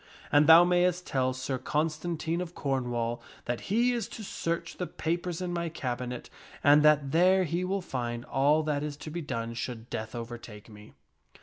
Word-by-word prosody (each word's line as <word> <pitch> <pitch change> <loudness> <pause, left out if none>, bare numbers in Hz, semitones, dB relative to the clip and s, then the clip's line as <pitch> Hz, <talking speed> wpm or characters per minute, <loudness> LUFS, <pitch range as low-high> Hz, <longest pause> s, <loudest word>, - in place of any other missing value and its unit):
And 145 +1 +5
thou 165 +2 +10
mayst 180 0 +2
tell 130 -1 0
Sir 130 0 -3
Constantine 160 +4 -1
of 175 -1 -6
Cornwall 120 -4 -1 0.2
that 120 -1 -2
he 235 +5 +3
is 235 -2 -2
to 220 - -8
search 170 -3 -3
the 180 - -3
papers 175 +1 -3
in 175 -1 -3
my 170 -1 -2
cabinet, 125 -4 -4 0.4
and 145 +2 +7
that 150 -2 +4
there 185 +4 +5
he 175 +2 -1
will 195 +2 -1
find 120 -5 -4
all 145 +4 +3
that 150 -2 -1
is 150 -1 -4
to 155 - -8
be 170 +2 -4
done 115 -6 -4
should 115 -1 -6
death 110 +2 -4
overtake 115 -2 -8
me." 105 -1 -14
150 Hz, 180 wpm, -29 LUFS, 125-175 Hz, 0.4 s, thou